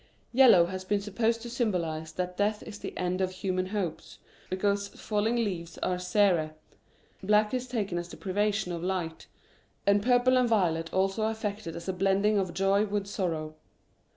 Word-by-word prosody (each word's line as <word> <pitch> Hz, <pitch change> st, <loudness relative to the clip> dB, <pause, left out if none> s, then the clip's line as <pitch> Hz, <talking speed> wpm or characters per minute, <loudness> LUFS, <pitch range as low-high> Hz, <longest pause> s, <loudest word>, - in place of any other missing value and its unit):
Yellow 235 Hz, -9 st, +7 dB
has 185 Hz, +1 st, -5 dB
been 205 Hz, +2 st, 0 dB
supposed 225 Hz, +3 st, -1 dB
to 240 Hz, -, -6 dB
symbolise 170 Hz, -10 st, -1 dB
that 180 Hz, +1 st, -3 dB
death 210 Hz, +2 st, 0 dB
is 205 Hz, -, -9 dB
the -, -, -5 dB
end'Of 185 Hz, +1 st, 0 dB
human 185 Hz, 0 st, -2 dB
hopes, 190 Hz, -5 st, -4 dB, 0.3 s
because 200 Hz, +2 st, 0 dB
falling 215 Hz, +3 st, -1 dB
leaves 180 Hz, -8 st, -2 dB
are 180 Hz, -1 st, 0 dB
sere; 180 Hz, -5 st, +2 dB, 0.7 s
black 210 Hz, +3 st, +3 dB
is 255 Hz, 0 st, -2 dB
taken 205 Hz, -8 st, -2 dB
as 175 Hz, 0 st, -6 dB
the -, -, -10 dB
privation 205 Hz, 0 st, 0 dB
of 170 Hz, -1 st, -4 dB
light; 180 Hz, -3 st, -3 dB, 0.6 s
and 200 Hz, 0 st, +4 dB
purple 250 Hz, +2 st, +4 dB
or 250 Hz, -, +3 dB
violet 165 Hz, -7 st, +1 dB
also 195 Hz, +3 st, +1 dB
affected 210 Hz, -5 st, -4 dB
as 170 Hz, -, -8 dB
a 190 Hz, -, 0 dB
blending 195 Hz, +3 st, +2 dB
of 185 Hz, -2 st, -1 dB
jpy 195 Hz, +2 st, +2 dB
with 205 Hz, -1 st, -1 dB
sorrow. 165 Hz, -6 st, -3 dB
195 Hz, 165 wpm, -29 LUFS, 180-210 Hz, 0.7 s, Yellow